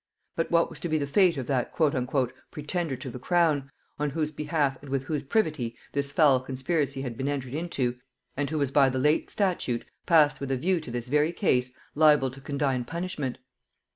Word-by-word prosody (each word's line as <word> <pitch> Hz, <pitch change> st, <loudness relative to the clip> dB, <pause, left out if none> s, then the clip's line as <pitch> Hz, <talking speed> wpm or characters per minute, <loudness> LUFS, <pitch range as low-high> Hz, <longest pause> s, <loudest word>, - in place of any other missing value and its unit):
But 165 Hz, -, -1 dB
what 170 Hz, 0 st, +4 dB
was 160 Hz, -, -6 dB
to 175 Hz, -, -4 dB
be 155 Hz, -, +2 dB
the 145 Hz, -, -1 dB
fate 170 Hz, +3 st, +3 dB
of 130 Hz, -, -3 dB
that 130 Hz, -3 st, -1 dB
"pretender 140 Hz, +3 st, -1 dB
to 130 Hz, -, -7 dB
the 125 Hz, -, -7 dB
crown," 155 Hz, -3 st, +2 dB, 0.3 s
on 150 Hz, 0 st, 0 dB
whose 155 Hz, +1 st, -2 dB
behalf 145 Hz, -3 st, -1 dB
and 140 Hz, -, -11 dB
with 135 Hz, -1 st, -1 dB
whose 150 Hz, +1 st, -2 dB
privity 145 Hz, -, 0 dB, 0.2 s
this 140 Hz, 0 st, -1 dB
foul 145 Hz, -4 st, +5 dB
conspiracy 135 Hz, +1 st, -2 dB
had 125 Hz, -3 st, -4 dB
been 135 Hz, +4 st, -3 dB
entered 135 Hz, -3 st, -3 dB
into, 140 Hz, -6 st, -1 dB, 0.4 s
and 145 Hz, +1 st, -1 dB
who 155 Hz, -, -2 dB
was 140 Hz, -3 st, 0 dB
by 140 Hz, -1 st, +5 dB
the 130 Hz, -, -2 dB
late 150 Hz, +4 st, +2 dB
statute, 175 Hz, -, -1 dB, 0.2 s
passed 150 Hz, -3 st, +5 dB
with 140 Hz, -, -4 dB
a 135 Hz, -, +1 dB
view 180 Hz, +7 st, +1 dB
to 155 Hz, -, -9 dB
this 120 Hz, 0 st, -4 dB
very 150 Hz, +4 st, +2 dB
case, 130 Hz, -, +1 dB, 0.2 s
liable 150 Hz, -4 st, +5 dB
to 135 Hz, +1 st, -12 dB
condign 140 Hz, -3 st, -1 dB
punishment? 160 Hz, -3 st, -4 dB
145 Hz, 200 wpm, -27 LUFS, 130-155 Hz, 0.4 s, foul